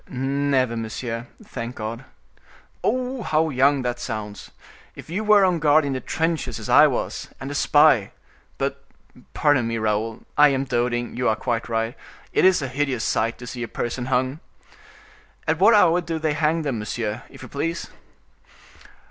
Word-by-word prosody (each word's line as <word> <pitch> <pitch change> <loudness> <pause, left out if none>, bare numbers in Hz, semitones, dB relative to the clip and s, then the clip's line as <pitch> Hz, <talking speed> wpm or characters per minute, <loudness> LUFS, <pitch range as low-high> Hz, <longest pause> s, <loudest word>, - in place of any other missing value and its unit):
"Never, 135 -1 0
monsieur—thank 115 - -6
God!" 115 +4 -6 0.8
"Oh! 255 +1 -1
how 160 -5 +1
young 135 +1 +3
that 120 0 -2
sounds! 105 -3 -6 0.5
If - - -11
you 200 +5 -2
were 210 -2 +6
on 180 -3 +1
guard 150 0 +4
in 140 - -1
the 130 - -2
trenches, 160 +5 -2
as - - -7
I - - +7
was, - - -3
and 135 +2 -6
a - - -4
spy! 145 -7 +4 0.5
But, 140 0 -3 0.5
pardon 145 -6 +3
me, 115 0 -2
Raoul, 110 0 -1 0.2
I 150 - +9
am 135 -1 +1
doting—you 120 -1 -1
are 110 - +2
quite 120 -1 -2
right, 115 +2 -1 0.4
it - - +3
is 185 -5 +4
a - - -2
hideous 130 -2 -1
sight 115 +1 0
to 125 - -9
see 120 0 -7
a 120 - -3
person 120 +3 -4
hung! 130 +3 0 1.1
At 165 - +1
what 215 +4 +6
hour 180 -3 +5
do 165 -1 -3
they 155 -1 0
hang 155 +2 +1
them, 135 -6 -2
monsieur, 105 0 -3
if - - -13
you - - -8
please?" 165 +4 -3
135 Hz, 165 wpm, -23 LUFS, 120-155 Hz, 1.1 s, I